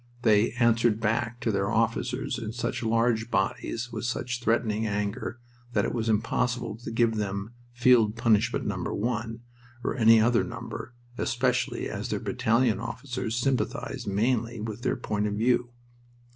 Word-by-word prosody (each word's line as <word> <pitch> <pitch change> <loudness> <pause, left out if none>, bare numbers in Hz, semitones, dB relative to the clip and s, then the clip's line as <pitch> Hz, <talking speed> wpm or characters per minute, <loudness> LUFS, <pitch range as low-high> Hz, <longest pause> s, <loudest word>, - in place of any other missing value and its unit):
They 110 +1 +4
"answered 115 -2 +3
back" 115 +2 0
to 115 - +1
their 100 -1 0
officers 115 +3 0
in 110 -1 -5
such 120 0 -2
large 115 0 +1
bodies, 115 +3 -1
with 110 0 -5
such 120 +1 -2
threatening 110 -2 +1
anger, 105 +3 -3 0.3
that - - +2
it - - -2
was 115 -1 -1
impossible 115 +1 0
to 115 - -7
give 115 -1 +2
them 100 +1 -3 0.2
"Field 120 -3 +4
Punishment 115 0 +2
Number 95 -4 -2
One," 115 +1 -2 0.4
or - - -1
any 115 -2 +6
other 115 +2 +3
number, 120 - -7 0.2
especially 125 +1 0
as - - -4
their - - -1
battalion 120 -3 +1
officers 120 0 -4
sympathized 120 -4 -1
mainly 115 +3 0
with 110 +1 -5
their 130 +1 0
point 105 -3 -1
of 105 - -2
view. 120 +2 +2
115 Hz, 150 wpm, -27 LUFS, 110-120 Hz, 0.4 s, any